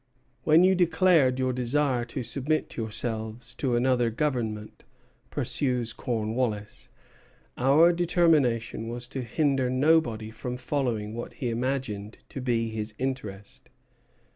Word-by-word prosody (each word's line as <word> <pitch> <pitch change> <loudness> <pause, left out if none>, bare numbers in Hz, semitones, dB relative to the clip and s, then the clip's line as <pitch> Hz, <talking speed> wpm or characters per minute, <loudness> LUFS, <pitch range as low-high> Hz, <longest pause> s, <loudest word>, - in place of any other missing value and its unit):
"When 160 +3 +6
you 190 +1 +5
declared 175 -7 +4
your 130 -1 0
desire 125 0 +1
to 125 +2 -5
submit 140 +6 -1
yourselves 110 +1 -4
to 125 -2 -1
another 120 -1 +2
Government," 115 -5 -3 0.5
pursues 125 -4 -1
Cornwallis, 110 -3 -3 0.7
"our 150 +7 +5
determination 155 -11 +2
was 120 +1 -5
to 130 - -4
hinder 135 +1 +1
nobody 130 -5 +2
from 125 +2 -5
following 125 -5 -2
what 120 +1 -6
he 125 -3 -3
imagined 115 -4 -3
to 135 - -6
be 115 -2 0
his 110 -1 -5
interest. 110 -7 -5
125 Hz, 115 wpm, -27 LUFS, 115-140 Hz, 0.7 s, When